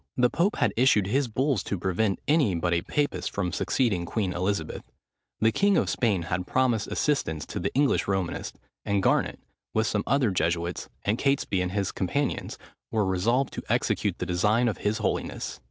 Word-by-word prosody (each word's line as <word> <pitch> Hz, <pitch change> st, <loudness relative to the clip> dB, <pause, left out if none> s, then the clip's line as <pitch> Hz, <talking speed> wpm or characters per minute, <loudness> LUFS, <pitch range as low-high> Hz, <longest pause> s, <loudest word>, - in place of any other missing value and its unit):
The 125 Hz, -1 st, +3 dB
pope 185 Hz, +6 st, +1 dB
had -, -, +1 dB
issued 115 Hz, -5 st, +4 dB
his 130 Hz, +7 st, +1 dB
bulls 130 Hz, +1 st, 0 dB
to 100 Hz, -, -3 dB
prevent 95 Hz, +3 st, 0 dB
any 145 Hz, -, +3 dB
but 85 Hz, +1 st, 0 dB
a 85 Hz, -, +2 dB
papist 145 Hz, -, -1 dB
from 95 Hz, -3 st, -2 dB
succeeding 100 Hz, -8 st, 0 dB
Queen 95 Hz, -3 st, -1 dB
Elizabeth; 90 Hz, -2 st, -2 dB, 0.6 s
the 110 Hz, +1 st, +4 dB
king 200 Hz, -, +3 dB
of -, -, +1 dB
Spain 105 Hz, -8 st, +1 dB
had 90 Hz, +2 st, -3 dB
promised 125 Hz, -5 st, +1 dB
assistance 80 Hz, -, -1 dB
to -, -, -5 dB
the -, -, -2 dB
English 140 Hz, 0 st, +2 dB
Romanists; 95 Hz, -3 st, -2 dB, 0.3 s
and 100 Hz, -1 st, 0 dB
Garnet, -, -, +2 dB, 0.4 s
with 110 Hz, 0 st, +3 dB
some 105 Hz, -1 st, 0 dB
other 130 Hz, -5 st, +2 dB
Jesuits, 85 Hz, -1 st, -1 dB, 0.2 s
and 105 Hz, +3 st, +1 dB
Catesby 135 Hz, -9 st, +1 dB
and 90 Hz, 0 st, -2 dB
his 100 Hz, -2 st, 0 dB
companions, 140 Hz, +9 st, -2 dB, 0.3 s
were 110 Hz, -2 st, +1 dB
resolved 115 Hz, +8 st, +1 dB
to -, -, -5 dB
execute -, -, 0 dB
the -, -, -3 dB
designs 105 Hz, +7 st, +2 dB
of -, -, -10 dB
his 105 Hz, +1 st, 0 dB
holiness. -, -, -3 dB
105 Hz, 180 wpm, -27 LUFS, 90-130 Hz, 0.6 s, issued